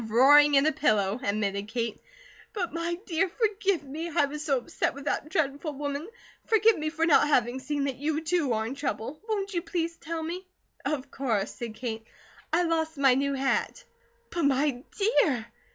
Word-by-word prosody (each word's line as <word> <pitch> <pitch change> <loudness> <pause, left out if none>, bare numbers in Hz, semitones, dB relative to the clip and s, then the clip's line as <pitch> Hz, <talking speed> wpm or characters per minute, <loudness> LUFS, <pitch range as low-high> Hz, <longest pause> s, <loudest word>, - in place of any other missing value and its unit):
"Roaring 285 +6 +6
in 275 +1 +5
a 310 - +4
pillow," 215 -7 +1
admitted 200 -2 -1
Kate. 230 -1 -3 0.5
"But 360 -5 -3
my 335 +1 -2
dear, 360 +1 +1
forgive 400 - 0
me! 310 +5 -5
I 295 -2 +2
was 295 +1 -6
so 280 -3 +2
upset 245 - -2
with 280 0 -9
that 295 - -1
dreadful 300 -2 -1
woman. 285 +4 -4 0.4
Forgive 445 -1 +5
me 310 0 -2
for 325 +1 0
not 295 -2 +5
having 250 -3 +2
seen 285 +2 -2
that 275 -2 -2
you, 300 +3 -1
too, 320 -4 0
are 220 0 0
in 235 - -4
trouble. 270 0 -4
Won't 405 -2 -1
you 345 - 0
please 335 -1 -2
tell 330 0 -5
me?" 345 +3 -4 0.4
"Of 280 -3 -3
course," 225 -7 -1
said 230 -2 -6
Kate. 225 -2 -4 0.5
"I 345 +2 +3
lost 325 -2 -1
my 270 -2 +5
new 275 +2 0
hat." 270 - -1 0.5
"But, 340 -3 0
my 275 -2 +2 0.2
dear! 310 - +2
290 Hz, 185 wpm, -28 LUFS, 255-330 Hz, 0.5 s, Roaring